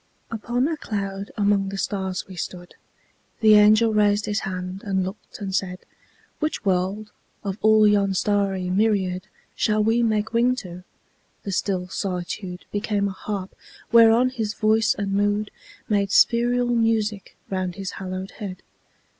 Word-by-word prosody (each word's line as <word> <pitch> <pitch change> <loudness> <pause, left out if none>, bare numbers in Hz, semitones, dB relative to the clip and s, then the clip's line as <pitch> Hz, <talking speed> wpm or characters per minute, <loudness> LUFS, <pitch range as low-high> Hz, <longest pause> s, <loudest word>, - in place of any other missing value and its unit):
Upon 240 +4 -1
a 320 -1 -2
cloud 200 -4 -4
among 200 -1 +2
the 195 - -5
stars 190 -2 -2
we 190 - -10
stood. 175 +1 -6 0.7
The 215 -1 +7
angel 215 +2 +6
raised 205 0 +3
his 210 0 -1
hand 185 0 -5
and 190 -2 0
looked 190 +3 -9
and 195 -2 -4
said, 185 -1 -1 0.6
"Which 310 -7 -2
world, 195 +3 0 0.3
of 200 0 -4
all 215 0 +6
yon 200 -2 +2
starry 195 -2 0
myriad 190 -2 +1 0.3
Shall 215 -1 +1
we 225 +2 +2
make 220 -1 0
wing 245 +2 +3
to?" 180 -6 -8 0.6
The 200 - -4
still 185 -1 -1
solitude 180 0 -4
Became 205 -1 0
a - - -3
harp 190 0 -5 0.4
whereon 230 +2 +6
his 220 -4 -3
voice 220 0 +2
and 200 -1 -3
mood 205 +1 0 0.4
Made 200 -2 +1
spheral 240 +2 +3
music 225 -4 0
round 185 -2 -2
his 195 -1 -5
haloed 185 0 -5
head. 190 -4 -7
205 Hz, 145 wpm, -23 LUFS, 190-220 Hz, 0.7 s, The